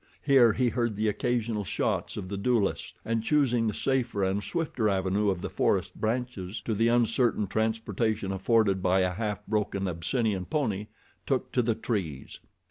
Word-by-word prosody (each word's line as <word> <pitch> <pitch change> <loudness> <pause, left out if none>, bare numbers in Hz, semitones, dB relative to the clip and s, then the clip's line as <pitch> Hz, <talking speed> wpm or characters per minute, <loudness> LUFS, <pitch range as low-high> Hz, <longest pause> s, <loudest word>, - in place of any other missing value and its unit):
Here 130 -6 +6
he 125 -2 +2
heard 115 -1 -1
the 110 +2 0
occasional 115 0 -1
shots 90 - -2
of 95 - -5
the 100 - -4
duelists, 105 0 0
and 115 0 0
choosing 125 -3 +2
the 105 - 0
safer 125 -6 0
and 95 +2 0
swifter 125 - -1
avenue 95 +1 +1
of 95 -3 -1
the - - -4
forest - - +1
branches 110 -4 -3
to 115 - -2
the 115 +2 +2
uncertain 120 -1 +2
transportation 110 -1 -1
afforded 95 0 +2
by 95 +1 +3
a 90 0 +1
half 105 -1 -3
broken 100 -2 -1
Abyssinian 95 +3 -1
pony, 105 - -1 0.4
took - - 0
to 125 - +2
the 115 -1 0
trees. 95 - -4
110 Hz, 165 wpm, -28 LUFS, 100-120 Hz, 0.4 s, Here